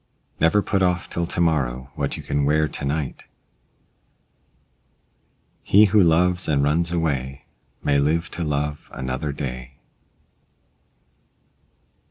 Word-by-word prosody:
Never 90 +6 +3
put 100 - 0
off 90 -1 0
till 85 0 -1
to 85 - -2
morrow 65 -6 0
what 70 -1 -3
you - - -8
can 70 0 -1
wear 75 +2 +2
to 70 - -5
night. 70 0 -3 2.4
He 105 +2 +5
who 105 - +6
loves 90 +2 +2
and 70 -3 +2
runs 80 +4 +1
away, 70 -6 -2 0.4
may 70 -1 +2
live 80 +4 0
to 85 - -4
love 75 -1 -3
another 65 +3 -3
day. 65 -2 -6
75 Hz, 120 wpm, -23 LUFS, 70-85 Hz, 2.4 s, who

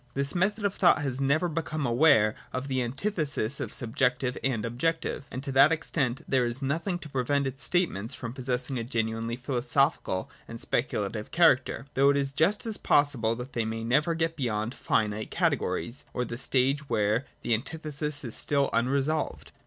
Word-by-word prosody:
27.] - - -3
This 140 0 +1
method 205 +4 +1
of 200 - +1
thought 175 -5 +4
has 135 -1 -2
never 140 +6 +2
become 155 -2 -3
aware 120 -4 +4 0.2
of 130 +2 -4
the 130 -2 0
antithesis 140 - -1
of - - -4
subjective 125 +1 0
and 120 -5 0
objective: 140 +5 -2
and 130 +2 -6
to 140 - -3
that 135 +3 +6
extent 140 -5 -1
there 130 -3 +2
is 120 +2 -2
nothing 165 +7 -1
to 170 - -10
prevent 140 +1 0
its 135 +1 -4
statements 135 - 0
from 120 -2 -6
possessing 125 0 -2
a - - -3
genuinely 115 -1 -2
philosophical 125 -5 0 0.2
and 115 - -8
speculative 105 -4 -2
character, 160 -6 +3
though 140 +1 +4
it 140 - +3
is 135 -1 0
just 185 - +2
as 220 -2 0
possible 125 -6 +2
that 125 +2 -8
they 115 - 0
may 110 +1 -4
never 150 +8 +2
get 165 0 -1
beyond 115 -4 -2
finite 110 -3 -1
categories, 120 +11 -1
or 125 - 0
the 120 - -5
stage 135 +3 +1
where 105 +5 +1 0.2
the 120 - +1
antithesis 150 +3 -2
is 120 -4 -5
still 140 -1 +1
unresolved. 135 +6 0
135 Hz, 175 wpm, -28 LUFS, 120-150 Hz, 0.2 s, that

